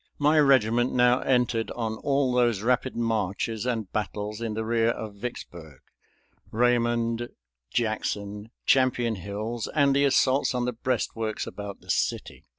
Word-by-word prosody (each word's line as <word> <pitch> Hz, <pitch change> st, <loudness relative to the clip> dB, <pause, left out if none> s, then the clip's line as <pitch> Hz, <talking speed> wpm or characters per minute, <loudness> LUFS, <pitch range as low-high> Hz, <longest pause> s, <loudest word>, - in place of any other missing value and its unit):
My 150 Hz, +2 st, +4 dB
regiment 120 Hz, -4 st, +4 dB
now 125 Hz, 0 st, +4 dB
entered 125 Hz, -3 st, +1 dB
on 115 Hz, -2 st, -2 dB
all 135 Hz, -1 st, +1 dB
those 120 Hz, -5 st, +2 dB
rapid 125 Hz, +2 st, +1 dB
marches 110 Hz, 0 st, -1 dB
and 110 Hz, -6 st, -2 dB
battles 105 Hz, +1 st, -3 dB
in 115 Hz, -2 st, -3 dB
the 110 Hz, 0 st, -2 dB
rear 115 Hz, 0 st, +2 dB
of 110 Hz, -2 st, -4 dB
Vicksburg 85 Hz, -, -8 dB, 0.7 s
Raymond, 120 Hz, 0 st, +1 dB, 0.4 s
Jackson, 105 Hz, -, -2 dB, 0.2 s
Champion 125 Hz, -3 st, +3 dB
Hills, 105 Hz, +5 st, -4 dB
and 140 Hz, -2 st, +4 dB
the 140 Hz, 0 st, +4 dB
assaults 135 Hz, -1 st, +2 dB
on 125 Hz, -1 st, 0 dB
the 125 Hz, -, -1 dB
breastworks 115 Hz, -2 st, -2 dB
about 100 Hz, -1 st, -8 dB
the -, -, -4 dB
city. -, -, -2 dB
115 Hz, 140 wpm, -26 LUFS, 110-125 Hz, 0.7 s, My